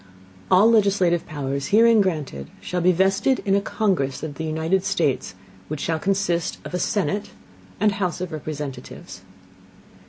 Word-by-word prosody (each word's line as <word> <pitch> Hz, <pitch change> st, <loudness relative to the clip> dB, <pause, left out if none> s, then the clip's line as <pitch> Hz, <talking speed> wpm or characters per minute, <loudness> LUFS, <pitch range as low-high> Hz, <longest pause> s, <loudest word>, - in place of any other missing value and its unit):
All 190 Hz, +4 st, +6 dB
legislative 195 Hz, -6 st, +2 dB
Powers 140 Hz, -2 st, -3 dB
herein 225 Hz, +1 st, +5 dB
granted 150 Hz, -, -3 dB
shall 180 Hz, -1 st, -3 dB
be 180 Hz, +2 st, +5 dB
vested 195 Hz, +9 st, +2 dB
in 195 Hz, -, +2 dB
a 200 Hz, -, +3 dB
Congress 185 Hz, -, -1 dB
of 155 Hz, -2 st, -4 dB
the 160 Hz, -, -6 dB
United 160 Hz, +4 st, 0 dB
States, 160 Hz, -, -1 dB, 0.3 s
which 155 Hz, -1 st, -5 dB
shall 160 Hz, -1 st, -1 dB
consist 190 Hz, -2 st, 0 dB
of -, -, -8 dB
a 180 Hz, -, -1 dB
Senate 205 Hz, +1 st, -1 dB, 0.5 s
and 210 Hz, +1 st, +3 dB
House 185 Hz, -3 st, -2 dB
of 180 Hz, -1 st, -4 dB
Representatives. 150 Hz, -, -7 dB
180 Hz, 150 wpm, -23 LUFS, 155-200 Hz, 0.5 s, All